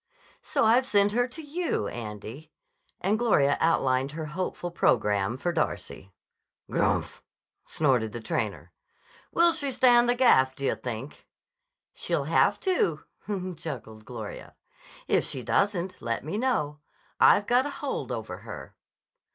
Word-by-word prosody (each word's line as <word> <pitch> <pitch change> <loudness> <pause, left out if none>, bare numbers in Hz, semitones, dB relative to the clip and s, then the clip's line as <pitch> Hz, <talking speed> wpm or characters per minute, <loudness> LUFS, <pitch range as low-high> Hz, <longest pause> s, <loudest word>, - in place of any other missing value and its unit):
"So - - 0
I've 245 +4 +4
sent 205 -4 +3
her 245 +3 +1
to 305 +6 -9
you, 330 +4 -2
Andy." 115 +7 -8 0.5
And 205 +4 +1
Gloria 145 -12 +3
outlined 135 -4 +1
her 160 0 -4
hopeful 175 +2 -4
programme 105 -7 +1
for 175 +6 -1
Darcy. 130 - -3 0.6
"Grmph!" - - 0 0.5
snorted 125 -8 +1
the 120 - -6
trainer. 110 - -3 0.6
"Will 340 0 +5
she 290 -4 -2
stand 245 -2 +5
the 245 - +3
gaff, 130 - +4
d' - - -13
yah 135 - +1
think?" 125 +3 -7 0.7
"She'll - - -1
have - - +3
to," 260 - +1 0.6
chuckled 110 -9 -7
Gloria. 110 -3 -8 0.5
"If - - +3
she 130 - -4
doesn't, 185 - 0
let 115 0 -2
me 160 - -4
know. 210 - 0 0.4
I've 205 - +6
got 250 +5 +3
a - - -4
hold 285 -1 -4
over - - -5
her." - - -9
160 Hz, 135 wpm, -27 LUFS, -, 0.7 s, I've